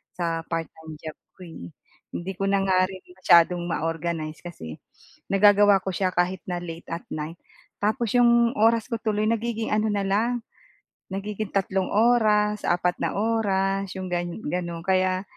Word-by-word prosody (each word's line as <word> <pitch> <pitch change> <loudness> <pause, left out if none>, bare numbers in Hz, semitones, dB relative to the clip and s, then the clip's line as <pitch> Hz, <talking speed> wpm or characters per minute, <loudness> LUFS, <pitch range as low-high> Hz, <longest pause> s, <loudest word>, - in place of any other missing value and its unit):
sa 165 -2 -2
part-time 160 -1 -5
job 155 -1 -8 0.2
ko - - -17
eh. 85 - -10 0.4
Hindi 185 +3 -4
ko 195 - 0
na 200 -1 +2
nga 185 -1 +3
rin 190 -1 -10
masyadong 175 -1 +4
ma-organize 165 -1 -3
kasi 80 - -9 0.5
nagagawa 205 0 +6
ko 190 - -2
siya 185 -2 0
kahit 180 +1 +1
na 175 -1 -2
late 165 0 -8
at 170 - -4
night. 155 +2 -5 0.5
Tapos 220 +1 0
yung 235 0 +4
oras 225 +1 +3
ko - - +1
tuloy 215 -1 0
nagiging 230 0 -2
ano 215 +1 +1
na 200 -1 0
lang, 230 +4 0 0.7
nagiging 205 +1 -4
tatlong 190 -1 0
oras, 210 -2 +3
apat 175 0 +1
na - - 0
oras, 195 -3 0
yung 185 -1 -5
gan 175 0 -1 0.2
gano'n. 170 +1 -3
Kaya 185 0 +2
190 Hz, 155 wpm, -25 LUFS, 175-210 Hz, 0.7 s, nagagawa